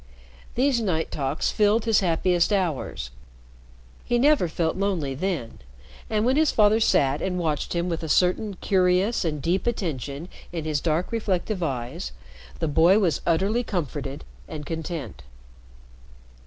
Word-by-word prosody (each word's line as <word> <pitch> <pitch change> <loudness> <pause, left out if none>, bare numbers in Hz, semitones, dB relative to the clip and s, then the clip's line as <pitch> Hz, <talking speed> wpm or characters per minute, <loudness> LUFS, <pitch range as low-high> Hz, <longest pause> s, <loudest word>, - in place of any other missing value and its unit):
These 255 -1 +2
night 165 -7 -1
talks 140 +1 -1
filled 215 +2 +2
his 225 -2 +4
happiest 175 0 +2
hours. 165 - -1 0.9
He 240 - +1
never 275 -6 +4
felt 160 0 -1
lonely 185 -8 -1
then, 155 -6 -3 0.5
and 215 0 +1
when 260 +3 +2
his 315 -1 +4
father 215 0 +4
sat 140 -9 +2
and 185 -1 -1
watched 155 -5 -1
him 170 +1 0
with 170 -2 -2
a 160 - -5
certain 185 +5 +2
curious 185 +4 +2
and 155 -3 -2
deep 180 +6 0
attention 155 - -3 0.2
in 165 -3 -4
his 150 -2 -1
dark, 165 +2 0
reflective 210 -3 -1
eyes, 120 - -3 0.4
the - - -1
boy 165 +6 +5
was 180 -8 +1
utterly 195 +8 +2
comforted 145 - -4 0.2
and 150 -2 -7
content. 160 - -5
175 Hz, 140 wpm, -25 LUFS, 155-205 Hz, 0.9 s, boy